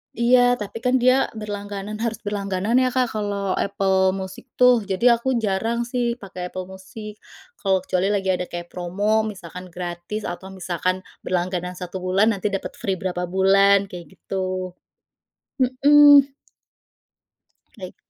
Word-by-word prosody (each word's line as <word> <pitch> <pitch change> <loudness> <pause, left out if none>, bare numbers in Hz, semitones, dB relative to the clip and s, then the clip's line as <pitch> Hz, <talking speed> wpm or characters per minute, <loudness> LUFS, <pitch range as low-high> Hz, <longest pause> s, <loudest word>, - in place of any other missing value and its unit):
iya 245 +1 +4
tapi 210 0 -7
kan 250 +2 +1
dia 255 +1 +4
berlangganan 205 -1 -6
harus 230 -1 -3
berlangganan 205 +2 0
ya 255 - +3
Kak, 255 -1 0
kalau 200 -2 -2
Apple 190 -1 +1
Music 190 +5 -7
tuh 245 -4 +4
jadi 235 +5 +3
aku 260 +2 0
jarang 225 +2 0
sih 240 -1 -1
pakai 185 -6 -7
Apple 185 +1 -6
Music, 190 +3 -10 0.4
kalau 190 -2 +1
kecuali 185 0 0
lagi 195 -2 +1
ada 180 -1 -2
kayak 175 0 -7
promo 200 +5 0
misalkan 185 -3 -8
gratis 175 +4 -6
atau 175 +2 -6
misalkan 185 0 -3 0.2
berlangganan 180 0 -2
1 180 +1 -6
bulan 190 +4 +2
nanti 205 -1 -2
dapet 195 -1 -3
free 195 - -1
berapa 180 -1 -3
bulan 195 +2 +4
kayak 180 +1 -10
gitu, 185 -1 -4 0.9
mhm. 280 +2 +6 1.5
Baik. 185 -1 -8
195 Hz, 140 wpm, -22 LUFS, 185-225 Hz, 1.5 s, mhm